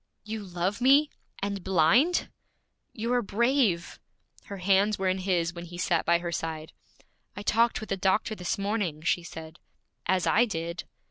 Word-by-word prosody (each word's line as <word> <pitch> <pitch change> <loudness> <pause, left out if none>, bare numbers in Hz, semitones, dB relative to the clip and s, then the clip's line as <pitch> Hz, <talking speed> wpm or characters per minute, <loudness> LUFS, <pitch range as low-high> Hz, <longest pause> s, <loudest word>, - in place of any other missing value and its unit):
'You 215 0 -5
love 185 +3 -3
me, 280 +4 +5 0.3
and 200 -2 -3
blind?' 190 - +3 0.6
'You 235 +2 -2
are 245 - +3
brave!' 230 -4 +1 0.5
Her 200 - -7
hands 195 +3 +2
were 190 - -1
in 185 +1 0
his 175 -3 0
when 170 0 -8
he 175 0 -10
sat 175 -2 0
by 170 0 +5
her 170 0 -5
side. 160 -1 -4 0.6
'I 205 - -6
talked 230 +3 +2
with 215 - -8
the 195 - -1
doctor 195 +4 +1
this 180 -4 -3
morning,' 200 -6 -2
she 175 +1 +1
said. 160 -1 -10 0.5
'As 185 -1 +2
I 240 - +4
did.' 170 -5 -4
190 Hz, 165 wpm, -27 LUFS, 170-215 Hz, 0.6 s, me